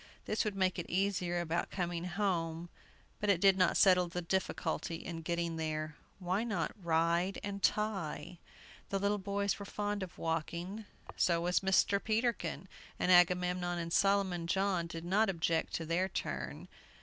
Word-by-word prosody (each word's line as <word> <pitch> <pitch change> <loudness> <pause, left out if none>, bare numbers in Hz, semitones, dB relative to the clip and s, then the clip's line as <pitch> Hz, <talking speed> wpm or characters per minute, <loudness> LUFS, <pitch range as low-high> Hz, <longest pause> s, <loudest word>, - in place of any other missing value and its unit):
This 215 - 0
would 210 -3 -2
make 185 -2 +1
it 175 - -5
easier 185 -2 0
about 170 0 -1
coming 175 -2 -3
home, 175 -3 -1 0.5
but 210 - -1
it 190 -4 +4
did 195 0 +6
not 180 -2 +3
settle 180 -2 +5
the 175 +1 -4
difficulty 170 -1 -1
in 165 0 -6
getting 170 0 -2
there. 155 -1 -3 0.2
Why 185 +3 -1
not 210 -8 -1
"Ride 170 +3 +1
and 200 0 -4
Tie"? 185 -6 -1 0.5
The 195 - 0
little 200 +1 +1
boys 200 +1 -1
were 200 - -6
fond 205 0 -2
of 185 -2 -7
walking; 170 +6 -3 0.3
so 170 -2 +2
was 180 +1 +2
Mr. 195 +1 +2
Peterkin; 225 -3 -1 0.3
and 185 - +1
Agamemnon 180 0 +4
and 170 -1 -3
Solomon 195 -4 +2
John 190 -2 +1
did 165 0 -7
not 200 +4 +3
object 165 -2 0
to 165 - -3
their 175 +4 0
turn. - - -4
180 Hz, 160 wpm, -33 LUFS, 170-200 Hz, 0.5 s, did